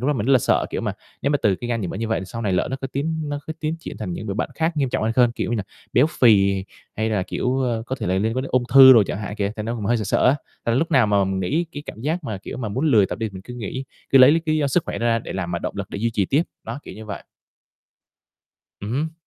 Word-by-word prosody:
lúc 125 - -2
đó - - +3
mình 120 -5 -2
rất 135 - +4
là 130 - +7
sợ. - - +1
Kiểu - - -2
mà, - - -2 0.3
nếu 140 - +1
mà 145 - +2
từ 100 - +3
cái 120 - -6
gan 115 -2 -1
nhiễm 90 - -3
mỡ - - -5
như 115 +1 -3
vậy 110 - 0
thì - - -6
sau 115 +4 -6
này 100 -3 0
lỡ 90 - +1
nó 135 - -2
có 135 - -3
tiến 155 +2 -2
nó 145 - -2
cứ 160 - -3
tiến 155 +1 -1
triển - - -8
thành 95 -5 -4
những 105 - -6
đồ 100 - -3
bệnh - - -2
khác 160 0 -1
nghiêm 140 -3 +1
trọng - - -1
hơn 115 +1 +1
hơn, 120 -2 +5
kiểu - - -3
như 120 - 0
nà, 105 - -1 0.3
béo 130 +5 +5
phì 100 -5 +5 0.3
hay 110 +1 0
là, 105 -4 +1
kiểu, 125 +7 -1
ơ, 120 -3 -1
có 130 - -3
thể - - -4
là 90 - +1
liên 110 +4 0
quan 130 - 0
đến 135 - -6
ung 125 -1 +2
thư 130 -1 +11
đồ 115 -4 +7
chẳng - - -3
hạn 105 -1 -5
kìa. 100 0 -1
Thành 105 - -4
ra 115 - -1
cũng 110 -4 -4
hơi 120 - +2
sợ 110 - -2
sợ - - +2
á, 130 +3 +4 0.3
là 115 - +2
lúc 165 +6 0
nào 130 -7 +4
mà 100 -1 +3
mình 95 0 -2
nghĩ 155 - 0
cái 145 - -6
cảm 110 - -8
giác 155 +5 -2
mà, 105 -5 -4
kiểu 95 - -8
mà, 115 -4 -3
muốn 130 +10 -1
lười 110 -9 +5
tập - - -5
đi, 110 - -2
mình 95 0 -9
cứ 125 - -9
nghĩ, 125 +3 -5 0.3
cứ 135 - +6
lấy 130 +2 +9
l - - +4
cái 155 - +2
lý 155 - +1
do 145 - +1
sức 150 +5 +1
khỏe - - -4
đó 120 - -1
ra 115 0 +3
để - - -7
làm 90 -2 -3
mà 85 - -1
động - - -5
lực 100 -1 -5
để - - -5
duy 115 +2 0
trì 105 -3 0
tiếp, 145 - +2 0.2
đó, 115 +4 -5
kiểu - - -9
như 110 - -9
vậy. 105 -2 -6 1.6
Ừm 100 +2 -5
hứm. 155 +4 -2
115 Hz, 340 wpm, -22 LUFS, 105-135 Hz, 1.6 s, thư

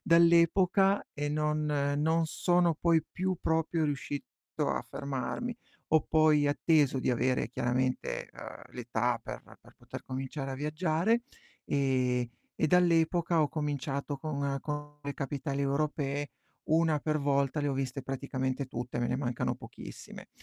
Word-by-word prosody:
Dall'epoca 175 +3 +5
e 145 0 -2
non 150 0 0 0.3
non 160 +2 +2
sono 175 +1 +2
poi 165 -1 +2
più 185 +2 -2
proprio 160 0 +1
riuscito 145 0 -3 0.4
a - - -1
fermarmi. 140 - -3 0.3
Ho 160 - +5
poi 155 -2 +4
atteso 145 -2 +3
di 130 - +1
avere 125 -1 +1
chiaramente, 130 +1 -1
ehm, - - -10
l'età 120 -1 -1
per - - -7 0.2
per - - -18
poter - - -9
cominciare 135 +1 -4
a - - -3
viaggiare 160 - +1 0.4
e 130 -3 +1 0.3
e - - +2
dall'epoca 170 -1 +3
ho 145 - +1
cominciato 145 -1 -2
con 140 -1 -2
con 150 0 -5
le 140 0 -3
capitali 140 0 -3
europee, 145 0 -1 0.4
1 160 -1 +3
per 155 +1 0
volta 140 0 +1
le 145 - 0
ho - - 0
viste 135 0 -2
praticamente 130 0 -2
tutte, 120 -1 -5
me 120 - +1
ne 125 - 0
mancano 125 -3 -1
pochissime. - - -10
145 Hz, 140 wpm, -30 LUFS, 135-160 Hz, 0.4 s, Dall'epoca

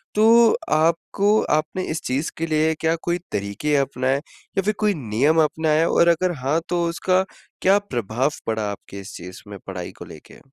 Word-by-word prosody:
तो 225 +2 +6
आपको 170 +7 +2 0.2
आपने 155 +4 -3
इस 155 0 -3
चीज़ 135 +5 -2
के 165 - -1
लिए 155 0 +2
क्या 160 0 +1
कोई 175 0 -1
तरीके 100 +9 -1
अपनाए? 130 -1 0
या 160 +5 -6
फ़िर 210 +3 +1
कोई 210 -1 +2
नियम 140 - +2
अपनाएँ? 155 +1 +1
और 170 - +3
अगर 175 +2 +3
हाँ 135 +5 0
तो 175 -1 0
उसका 185 +2 +1 0.4
क्या 195 +2 +5
प्रभाव 125 - -1 0.2
पड़ा? 110 -2 -1
आपके 100 0 -9
इस 95 - -10
चीज़ 90 +1 -9
में 100 -1 -8
पढ़ाई 90 -2 -6
को - - -8
लेके? - - -14
155 Hz, 175 wpm, -22 LUFS, 125-175 Hz, 0.4 s, तो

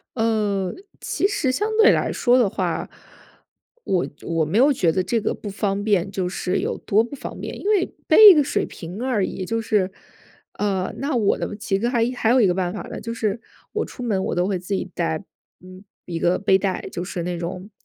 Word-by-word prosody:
呃， 210 -5 0 0.3
其 390 - 0
实 290 -10 0
相 420 +11 -1
对 450 +1 +7
来 - - +1
说 245 0 +3
的 235 -6 +3
话， - - -2 0.9
我 185 -2 0 0.2
我 165 -2 0
没 180 +8 -1
有 280 +3 +5
觉 175 -9 +2
得 185 +3 0
这 230 +2 0
个 - - -1
不 210 - -7
方 200 0 -2
便， 200 -3 +1
就 190 -2 -2
是 180 0 -2
有 - - -2
多 215 +3 +2
不 265 +4 -7
方 - - -8
便。 - - -6
因 405 - -2
为 405 -4 +3 0.2
背 430 -1 +10
一 - - +8
个 300 -3 +4
水 285 - -1
瓶 180 +6 -8
而 240 -7 +1
已， 185 - -5
就 225 +4 -1
是 205 -4 +1 0.6
呃， 195 -3 -1
那 280 0 -2
我 215 -4 +2
呢， - - -3
其 195 -2 -1
实 235 - 0
还 240 -2 +1
还 225 - +1
有 255 - +5
一 205 - +5
个 180 - +2
办 180 -1 -1
法 - - -5
了， - - -6
就 230 - -5
是 220 -1 -1 0.3
我 - - -1
出 - - -11
门 200 -5 0
我 - - -2
都 175 +1 +1
会 195 -2 0
自 180 +3 -5
己 190 - -2
带， 165 +1 -1 0.4
嗯， 185 +1 -13 0.2
一 170 -2 -4
个 175 +2 +2
背 190 -1 +4
带， 195 -1 -2
就 175 - -4
是 180 -1 -4
那 175 0 -3
种， 180 +3 -6
200 Hz, 240 characters per minute, -22 LUFS, 185-235 Hz, 0.9 s, 背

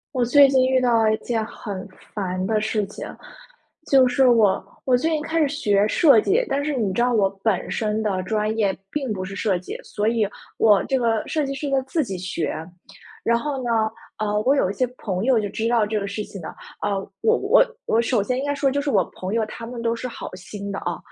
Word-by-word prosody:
我 250 - +2
最 280 +3 +7
近 260 -1 +3
遇 260 0 +3
到 230 -3 +3
一 215 - +2
件 225 -2 -2
很 205 -4 -7 0.3
烦 185 -2 -2
的 215 0 +1
事 215 -1 0
情， 205 - -8 0.9
就 265 -2 +6
是 255 +1 +4
我 220 -5 +3 0.2
我 255 - +4
最 315 +7 0
近 310 -1 0
开 325 +1 0
始 300 - +3
学 205 -8 +2
设 275 -7 +6
计， 420 - +2
但 280 +1 -1
是 300 0 -1
你 215 -8 -1
知 235 - 0
道 245 +1 +2
我 205 -5 +3
本 215 -5 0
身 215 -1 -1
的 195 -4 -1
专 215 +2 -1
业 200 -3 +2 0.2
并 270 -3 -3
不 185 -2 -3
是 195 +1 -7
设 195 -2 0
计， 180 - -7
所 210 0 -2
以 225 -1 +2 0.3
我 210 -3 +5
这 270 - +1
个 230 -3 +1
设 305 -2 0
计 275 - -3
是 280 +2 -4
呢 270 -1 +1
自 315 +4 0
己 195 -9 -4
学。 180 -3 -3 0.8
然 235 0 +3
后 270 +1 -3
呢， 240 - -3 0.5
呃， 210 -1 0
我 270 +4 +4
有 190 -9 +1
一 - - -6
些 255 +4 0
朋 190 0 -3
友 260 -2 +4
就 210 -2 -1
知 225 +3 -2
道 230 -3 +3
这 210 0 -1
个 200 - -4
事 205 +2 -4
情 200 - -9
的。 - - -7 0.3
呃， 205 -1 0 0.2
我 225 - +3
我 435 +5 +4 0.2
我 225 - +2
首 235 -3 +1
先 250 +4 -1
应 275 - -2
该 285 0 -1
说 280 -1 +1
就 285 - 0
是 285 0 -2
我 200 -8 +3 0.2
朋 185 +2 -3
友 225 -1 +1
他 230 +1 -8
们 240 -1 -6
都 230 0 +1
是 235 +2 -4
好 240 - -8
心 200 +2 -7
的 195 - -3
啊， 175 -1 -3
225 Hz, 260 characters per minute, -23 LUFS, 205-260 Hz, 0.9 s, 最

